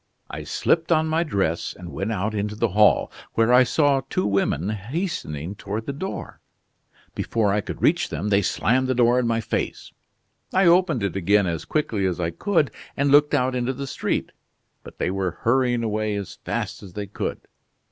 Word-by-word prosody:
I -, -, -6 dB
slipped 165 Hz, +1 st, +1 dB
on 160 Hz, -1 st, +4 dB
my 160 Hz, +1 st, +1 dB
dress 100 Hz, -, -1 dB
and 90 Hz, -2 st, -9 dB
went 100 Hz, +3 st, -3 dB
out 110 Hz, +1 st, -1 dB
into 105 Hz, 0 st, -2 dB
the -, -, +1 dB
hall, 105 Hz, +3 st, +4 dB, 0.2 s
where 115 Hz, +2 st, +3 dB
I 125 Hz, -, +8 dB
saw 140 Hz, +1 st, +2 dB
two 95 Hz, -, 0 dB
women 100 Hz, -1 st, 0 dB
hastening 105 Hz, -, -4 dB
toward 105 Hz, +2 st, -5 dB
the 140 Hz, -, -3 dB
door. 185 Hz, +8 st, -6 dB, 0.7 s
Before 105 Hz, -3 st, 0 dB
I 105 Hz, -, +1 dB
could -, -, -7 dB
reach -, -, +3 dB
them 105 Hz, -, -3 dB
they 100 Hz, 0 st, +4 dB
slammed 125 Hz, +7 st, +1 dB
the 130 Hz, -, 0 dB
door 120 Hz, +1 st, +4 dB
in 125 Hz, -, 0 dB
my 115 Hz, 0 st, +1 dB
face. 110 Hz, -, -3 dB, 0.6 s
I 190 Hz, 0 st, +4 dB
opened 170 Hz, -, +4 dB
it 100 Hz, -3 st, -1 dB
again 100 Hz, +2 st, +3 dB
as 85 Hz, -2 st, -3 dB
quickly 110 Hz, -11 st, 0 dB
as 90 Hz, -1 st, -2 dB
I 85 Hz, -1 st, -1 dB
could 155 Hz, -, +1 dB, 0.3 s
and 140 Hz, 0 st, +2 dB
looked 145 Hz, +1 st, +5 dB
out 130 Hz, -2 st, +1 dB
into 125 Hz, +1 st, -1 dB
the 140 Hz, +2 st, -5 dB
street. 135 Hz, -, -2 dB, 0.5 s
But -, -, -12 dB
they 90 Hz, -, -1 dB
were 95 Hz, -2 st, -2 dB
hurrying 120 Hz, 0 st, +2 dB
away 110 Hz, -1 st, -1 dB
as 100 Hz, -2 st, -6 dB
fast -, -, -3 dB
as 95 Hz, -4 st, -11 dB
they 105 Hz, +1 st, -4 dB
could." 100 Hz, -, -4 dB
110 Hz, 190 wpm, -23 LUFS, 100-140 Hz, 0.7 s, I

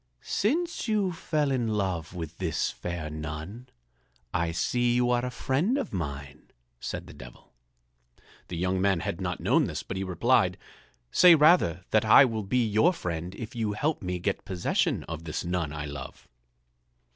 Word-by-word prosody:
"Since 330 Hz, -, -1 dB
you 210 Hz, -4 st, +1 dB
fell 155 Hz, -4 st, -1 dB
in 125 Hz, -3 st, 0 dB
love 95 Hz, -6 st, -2 dB
with 80 Hz, -2 st, -7 dB
this 85 Hz, -5 st, -1 dB
fair 85 Hz, -3 st, -5 dB
nun, 80 Hz, +10 st, -7 dB, 0.6 s
I 85 Hz, 0 st, 0 dB
see 120 Hz, +8 st, +1 dB
you 125 Hz, 0 st, +2 dB
are 120 Hz, 0 st, +2 dB
a 125 Hz, -, -1 dB
friend 145 Hz, -, 0 dB
of 280 Hz, -, -4 dB
mine," 70 Hz, -4 st, -6 dB, 0.3 s
said -, -, -5 dB
the -, -, -12 dB
Devil. 60 Hz, -1 st, -14 dB, 0.9 s
The 85 Hz, -, -5 dB
young 90 Hz, +2 st, 0 dB
man 95 Hz, -3 st, +2 dB
had -, -, -4 dB
not -, -, -3 dB
known -, -, +3 dB
this, -, -, -4 dB
but 95 Hz, -, -5 dB
he 95 Hz, -, -2 dB
replied: 90 Hz, -3 st, +2 dB, 0.5 s
"Say 175 Hz, -2 st, +8 dB
rather 150 Hz, -, +4 dB
that 110 Hz, -, +4 dB
I 110 Hz, +5 st, +8 dB
will 115 Hz, -3 st, -2 dB
be 120 Hz, +4 st, +1 dB
your 110 Hz, -, +3 dB
friend 90 Hz, -, -4 dB
if 115 Hz, -, -7 dB
you 110 Hz, -3 st, -1 dB
help 150 Hz, +9 st, -1 dB
me 90 Hz, -1 st, -2 dB
get 95 Hz, +3 st, -2 dB
possession 90 Hz, -2 st, 0 dB
of 80 Hz, -1 st, -7 dB
this 80 Hz, +2 st, -4 dB
nun 85 Hz, -4 st, -1 dB
I 75 Hz, 0 st, -5 dB
love." 70 Hz, -1 st, -8 dB
95 Hz, 170 wpm, -28 LUFS, 85-125 Hz, 0.9 s, Say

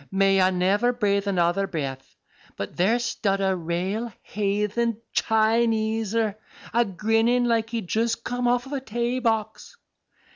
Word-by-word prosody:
may 195 Hz, 0 st, +3 dB
I 185 Hz, -, +5 dB
never 190 Hz, +6 st, +2 dB
brathe 200 Hz, -4 st, 0 dB
another 185 Hz, +1 st, +1 dB
breath, 135 Hz, -7 st, -5 dB, 0.4 s
but -, -, -5 dB
there 200 Hz, +7 st, +3 dB
stud 225 Hz, -4 st, -1 dB
a 190 Hz, -1 st, +1 dB
rale 185 Hz, +7 st, -2 dB
haythen 210 Hz, +3 st, -1 dB, 0.2 s
Chineser 220 Hz, -1 st, +1 dB, 0.4 s
a 235 Hz, +1 st, +4 dB
grinnin' 225 Hz, +4 st, +1 dB
like 225 Hz, -1 st, +1 dB
he'd 230 Hz, -5 st, -4 dB
just 230 Hz, +3 st, 0 dB
come 245 Hz, 0 st, -1 dB
off 245 Hz, +1 st, +1 dB
a 280 Hz, -2 st, -2 dB
tay 240 Hz, +1 st, -2 dB
box. 225 Hz, -, -2 dB
220 Hz, 135 wpm, -25 LUFS, 195-235 Hz, 0.4 s, I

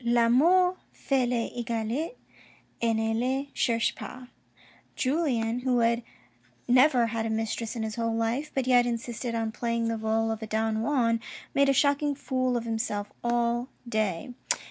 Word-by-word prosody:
'• -, -, -18 dB
L'amour 275 Hz, +11 st, +4 dB
Fait 265 Hz, -3 st, 0 dB
les 240 Hz, -2 st, -1 dB
egalites, 235 Hz, -, -2 dB, 0.7 s
et 230 Hz, -1 st, +2 dB
ne 220 Hz, 0 st, 0 dB
les 265 Hz, +4 st, -1 dB
cherche 230 Hz, -1 st, +1 dB
pas." 255 Hz, -1 st, -9 dB, 0.7 s
Julien 255 Hz, -5 st, 0 dB
who 250 Hz, -1 st, +1 dB
had 235 Hz, +1 st, +2 dB, 0.7 s
never 250 Hz, 0 st, +5 dB
had 225 Hz, -1 st, -1 dB
a -, -, -3 dB
mistress 225 Hz, +1 st, -2 dB
in 225 Hz, -, -2 dB
his 220 Hz, +1 st, -4 dB
whole 230 Hz, -1 st, 0 dB
life, 230 Hz, +6 st, -1 dB
but 265 Hz, -2 st, +1 dB
yet 245 Hz, -1 st, +4 dB
insisted 235 Hz, 0 st, -3 dB
on 225 Hz, -1 st, -1 dB
playing 230 Hz, 0 st, -1 dB
the 225 Hz, -, -1 dB
role 220 Hz, 0 st, 0 dB
of 220 Hz, 0 st, -4 dB
a 220 Hz, -, -5 dB
Don 220 Hz, 0 st, 0 dB
Juan, 230 Hz, -3 st, +2 dB, 0.3 s
made 280 Hz, 0 st, +4 dB
a -, -, +6 dB
shock 285 Hz, +1 st, +3 dB
ing 290 Hz, -1 st, 0 dB
fool 255 Hz, -2 st, 0 dB
of 235 Hz, -, -3 dB
himself 220 Hz, -3 st, -2 dB
all 240 Hz, +1 st, 0 dB, 0.2 s
day. 215 Hz, -2 st, -1 dB
235 Hz, 165 wpm, -28 LUFS, 225-255 Hz, 0.7 s, a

